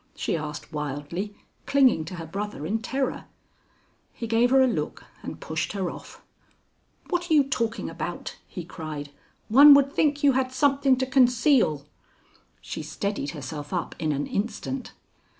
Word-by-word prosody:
she - - -1
asked 150 0 -6
wildly, 150 +7 -4 0.3
clinging 265 - +4
to 170 +4 -7
her 165 -2 -6
brother 200 -1 -5
in 220 +6 -1
terror. 265 +3 -2 0.9
He 235 - -6
gave 230 +2 +3
her 265 +1 +5
a - - +4
look 240 - -3 0.2
and - - -7
pushed - - -3
her 190 -3 -2
off. - - -12 0.9
"What 350 -1 -1
are 320 - +4
you 290 - +6
talking 230 -4 -2
about?" 170 +1 -5
he 180 - -7
cried. 155 -4 -7 0.4
"One 280 +5 +9
would 280 0 +3
think 290 -1 +1
you 285 - +6
had 260 0 0
something 275 -1 +3
to 260 - 0
conceal." 250 - +3 0.8
She - - -6
steadied 155 +1 -3
herself 145 +1 -7
up 175 -2 -2
in 155 -1 0
an 145 0 -1
instant. 235 +5 -4
220 Hz, 155 wpm, -26 LUFS, -, 0.9 s, One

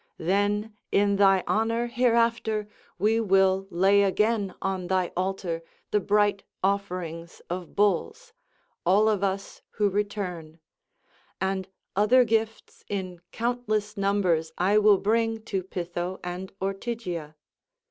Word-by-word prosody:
Then 205 +4 0 0.2
in 200 0 +3
thy 195 -2 +5
honour 230 +2 +1
hereafter 230 -3 +1 0.3
we 220 +2 +2
will 195 -2 +3
lay 195 +3 +4
again 205 +1 +1
on 190 -2 -2
thy 185 -1 0
altar 185 -2 -2 0.3
the 210 - +3
bright 205 0 +2 0.2
offerings 180 -4 -2
of 180 -1 -5
bulls—all 210 - 0
of 210 -3 +1
us 195 0 -3
who 205 -2 0
return; 185 -6 -3 0.8
and 190 0 -1 0.3
other 220 +6 +5
gifts 225 -1 -2
in 185 -3 -4
countless 220 -3 -1
numbers 195 -5 +1
I 200 +4 +3
will 210 -1 +6
bring 225 +2 0
to 195 -4 -2
Pytho 175 0 -4
and 180 +1 -5
Ortygia. 195 -5 -4
200 Hz, 115 wpm, -26 LUFS, 185-215 Hz, 0.8 s, will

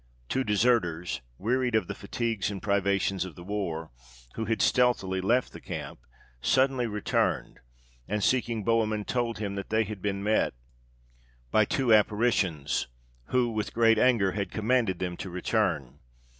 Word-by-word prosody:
Two 130 - +1
deserters, 95 - +1 0.2
wearied 125 +3 0
of 110 - +2
the 100 - -5
fatigues 110 +1 -2
and 100 -2 -5
privations 100 -1 +1
of 95 -4 -8
the 85 - -10
war, 85 -6 -3 0.4
who 110 - -3
had 110 0 -1
stealthily 105 -8 +2
left 120 +7 +1
the - - -10
camp, - - -6 0.4
suddenly 130 - +2
returned, 105 -2 -1 0.5
and 105 0 -1
seeking 115 -4 +1
Bohemund, 110 -2 +1
told 120 -2 -1
him 100 -2 -3
that 100 0 -5
they 110 +1 +2
had 105 -2 -7
been 100 0 -2
met 105 - +1 1.0
by 110 - +4
two 125 +1 +2
apparitions, 105 - +2 0.4
who, 125 - +1
with 110 -1 -3
great 115 -1 +5
anger, 110 -7 +4
had 100 0 -3
commanded 110 -3 +1
them 90 -1 -3
to 95 - -6
return. 90 - -1
105 Hz, 150 wpm, -28 LUFS, 95-115 Hz, 1.0 s, great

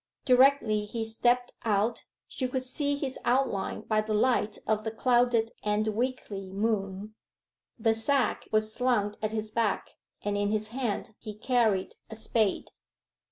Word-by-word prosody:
Directly 250 -5 +4
he 225 +2 -4
stepped 240 +2 +1
out 220 +1 0 0.2
she 260 - -2
could 255 0 -2
see 285 +3 -1
his 275 -2 -4
outline 245 -5 0
by 215 -1 +1
the 215 0 -2
light 220 -2 +2
of 215 0 0
the 220 - -2
clouded 240 0 +2
and 210 +1 0
weakly 215 -4 -3
moon. 200 0 -2 0.6
The 225 -1 +2
sack 245 +2 +1
was 215 0 +1
slung 235 -5 +1
at 215 0 -1
his 215 -1 -3
back, 225 -2 0 0.3
and 205 0 -1
in 205 0 0
his 215 0 0
hand 230 -3 -3
he 215 -2 -8
carried 220 -5 +1
a 220 - -7
spade. 220 -2 0
220 Hz, 150 wpm, -28 LUFS, 210-245 Hz, 0.6 s, Directly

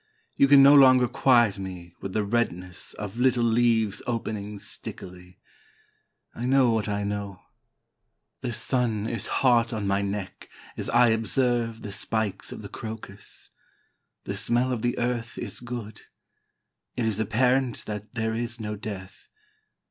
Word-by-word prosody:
You 140 - +5
can 140 0 +8
no 140 +1 +9
longer 130 -3 +7
quiet 120 -6 +3
me 90 -3 -7
with 95 - -5
the 110 - +1
redness 90 -5 -2
Of 105 +1 -6
little 125 -1 +3
leaves 115 -3 +2
opening 105 -3 -3
stickily. 90 -2 -9 1.0
I 120 - -5
know 130 -2 +4
what 110 -2 0
I 105 0 -1
know. 100 -2 -4 1.0
The 125 -2 -3
sun 115 -3 0
is 115 -3 -3
hot 120 -3 +3
on 110 -3 -3
my 100 0 +1
neck 100 -1 -5 0.3
as - - -4
I 120 0 +5
observe 115 0 0
The 105 - -6
spikes 105 0 -2
of - - -8
the - - -6
crocus. 110 -2 -7 0.7
The - - -4
smell 125 +2 +1
of 120 -3 -2
the 120 +1 0
earth 120 -1 -2
is - - -6
good. 120 -3 -7 1.0
It 120 - 0
is 110 -2 -1
apparent 125 +3 +1
that 105 +1 -7
there 110 -1 -1
is 120 +1 -3
no 105 -1 -4
death. 100 -2 -8
110 Hz, 150 wpm, -26 LUFS, 100-120 Hz, 1.0 s, no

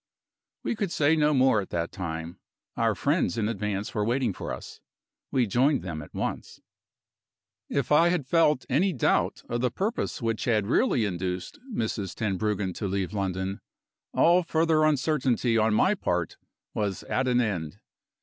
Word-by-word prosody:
We - - -1
could 200 -5 -2
say 150 0 +3
no 150 -1 +3
more 130 -6 +4
at 95 - -8
that 85 -1 -2
time. 80 -2 -5 0.4
Our - - +1
friends 90 - +1
in 105 -2 +1
advance 105 -2 -3
were 105 - 0
waiting 120 -1 0
for - - -6
us. - - -8 0.5
We 130 -2 +2
joined 130 +7 +2
them 80 -4 -5
at 75 - -11
once. - - -4 1.1
If 140 -2 -1
I 165 +3 +6
had 175 -6 0
felt 150 -2 +3
any 175 +9 +2
doubt 125 - +1
of 120 0 -2
the 125 - +2
purpose 210 - -2
which 115 -2 -2
had 110 -4 +2
really 125 - +2
induced 90 -1 -4
Mrs. 105 - -3
Tenbruggen 105 -2 -1
to 105 - -2
leave 95 0 -2
London, 95 -1 -2 0.5
all 175 +2 +4
further 160 -2 +2
uncertainty 135 -5 +1
on 110 -1 +3
my 190 - +4
part 90 - -2 0.4
was 100 -3 -2
at 130 0 -1
an 125 -1 +3
end. 90 -10 -2
115 Hz, 160 wpm, -27 LUFS, 95-150 Hz, 1.1 s, I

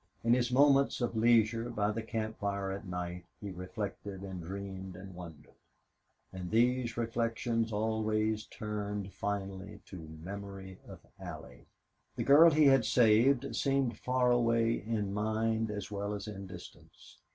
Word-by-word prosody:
In 115 +1 +4
his 125 0 +2
moments 140 +1 +4
of 120 -2 -1
leisure, 115 0 +3
by 105 -3 0
the 115 +2 -3
camp 110 0 -4
fire 100 -1 -2
at 100 +1 -6
night, 90 0 -4 0.2
he 100 -2 -6
reflected 95 +1 -6
and 95 -2 -6
dreamed 95 +1 -6
and 95 +1 -10
wondered. 80 -4 -11 0.8
And 90 -1 -6
these 120 +2 +2
reflections 115 0 -1
always 110 0 0
turned 105 -2 -5
finally 100 0 -4
to 80 -4 -10
memory 95 0 -8
of - - -11 0.2
Allie. 65 -1 -9 0.5
The - - -2
girl 150 +5 +8
he 155 -1 +4
had 135 -3 +6
saved 120 +3 +4
seemed 135 -5 0
far 125 -1 +2
away 115 -1 +3
in 105 -3 -2
mind 110 +1 0
as 105 -1 -5
well 100 +1 -3
as 100 +1 -6
in 100 -2 -7
distance. 90 -2 -13
105 Hz, 145 wpm, -32 LUFS, 95-115 Hz, 0.8 s, girl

